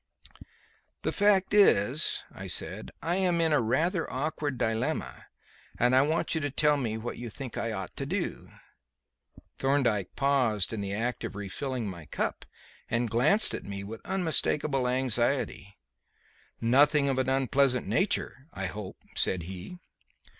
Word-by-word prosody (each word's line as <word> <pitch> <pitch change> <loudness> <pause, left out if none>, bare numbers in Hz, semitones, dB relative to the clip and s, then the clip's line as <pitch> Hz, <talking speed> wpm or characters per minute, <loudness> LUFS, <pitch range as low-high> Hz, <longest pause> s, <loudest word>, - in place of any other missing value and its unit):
"The - - 0
fact 200 -2 +3
is," 150 - +4
I - - -8
said, - - -4
"I 170 +3 0
am 180 -3 +2
in 165 -2 +3
a 145 - +4
rather 165 - 0
awkward 145 0 -2
dilemma, 110 0 -2 0.5
and 125 +1 +3
I 130 - +7
want 155 +4 0
you 160 - 0
to 145 - -1
tell 150 +2 +3
me 115 -6 -2
what 120 +2 -5
you 120 -1 -5
think 125 +2 -7
I 115 - -2
ought 95 -3 -5
to 135 - -3
do." 185 +3 -3 1.1
Thorndyke 125 -8 +1
paused 125 -8 +2
in 110 - -3
the 100 -1 -3
act 120 +5 -2
of 115 -3 -5
refilling 115 +4 -3
my 85 -5 -8
cup - - -3 0.4
and 115 -1 0
glanced 150 - +4
at - - -4
me 100 0 -6
with 110 +3 -8
unmistakable 155 -7 0
anxiety. 125 -5 0 0.8
"Nothing 140 +5 +4
of 135 -1 +1
an 130 - +1
unpleasant 135 -1 +2
nature, 135 - -1
I 95 - -4
hope," 95 +1 -6 0.2
said 90 -2 +1
he. 95 - -8
130 Hz, 150 wpm, -29 LUFS, 110-150 Hz, 1.1 s, I